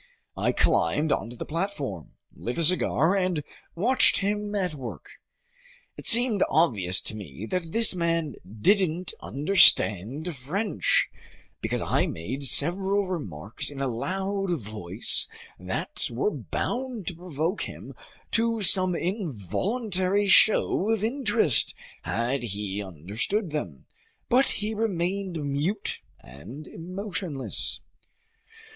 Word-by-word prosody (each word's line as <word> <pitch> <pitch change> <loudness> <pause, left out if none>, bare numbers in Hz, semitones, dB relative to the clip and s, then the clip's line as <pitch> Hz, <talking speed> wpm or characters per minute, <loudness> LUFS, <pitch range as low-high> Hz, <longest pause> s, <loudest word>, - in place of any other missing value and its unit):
I - - +1
climbed 150 - +1
onto 115 +2 -2
the - - -6
platform, 150 - -4 0.2
lit 120 - -5
a 170 - +1
cigar, 175 +1 +3
and 180 -5 0 0.3
watched 245 +10 +3
him 205 +1 -2
at 185 -5 -1
work. 130 -5 -8 0.9
It - - -6
seemed 230 -4 +7
obvious 110 - +2
to - - -3
me 95 -2 -8
that 180 -3 -2
this 230 +1 +6
man 165 -4 -1 0.3
didn't 185 -3 +2
understand 145 - +3
French, 180 - 0 0.5
because - - -2
I - - +1
made 110 +13 -5
several 190 +8 +2
remarks 105 - -1
in 140 -2 -8
a 135 - 0
loud 190 - -2
voice 105 - -1 0.3
that - - -2
were 125 - 0
bound 220 - -4
to 180 - -3
provoke 170 +2 -3
him - - -10 0.4
to 230 -1 +1
some 185 -1 +7
involuntary 190 - -1
show 205 0 +4
of 225 -2 0
interest 230 - +3 0.3
had 120 +4 -1
he 105 -3 -4
understood 105 - -3
them; 85 - -5 0.4
but 260 +3 +4
he 215 +1 -2
remained 190 -5 -2
mute 150 +9 -2 0.2
and 110 - -11
emotionless. 180 -4 -4
170 Hz, 115 wpm, -26 LUFS, 125-200 Hz, 0.9 s, seemed